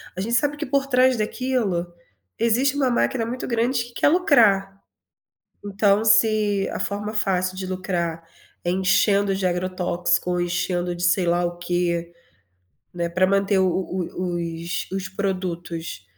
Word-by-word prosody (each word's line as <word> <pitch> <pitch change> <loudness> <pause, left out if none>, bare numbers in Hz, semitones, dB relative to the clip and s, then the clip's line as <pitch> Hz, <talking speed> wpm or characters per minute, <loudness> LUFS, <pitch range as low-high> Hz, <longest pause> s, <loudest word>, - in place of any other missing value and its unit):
A 185 - -3
gente 230 +4 -1
sabe 290 +5 +1
que 305 - -3
por 275 +1 0
trás 255 -1 +3
daquilo, 215 -6 -1 0.5
existe 250 +5 +2
uma 270 -3 +2
máquina 240 -1 0
muito 245 +3 -4
grande 235 +1 0
que 240 - -15
quer - - +2
lucrar. 220 - +3 0.8
Então 205 +1 +2
se 210 -2 +3
a - - -4
forma 205 +1 -3
fácil 185 -3 0
de 190 - -4
lucrar 175 -3 -3 0.4
é 175 - +1
enchendo 195 +2 +2
de 190 -1 -2
agrotóxico, 180 0 -1
enchendo 175 0 -1
de 175 - -6
sei 175 +1 +2
lá 175 +1 +1
o 175 0 -4
quê, 175 -1 -1 0.8
né, 170 -1 -2
para 185 +2 +2
manter 195 0 +2
o 190 - +3
o 180 0 -3
os 170 0 -4
os 190 -1 -3
produtos 175 - -4
190 Hz, 150 wpm, -23 LUFS, 175-220 Hz, 0.8 s, trás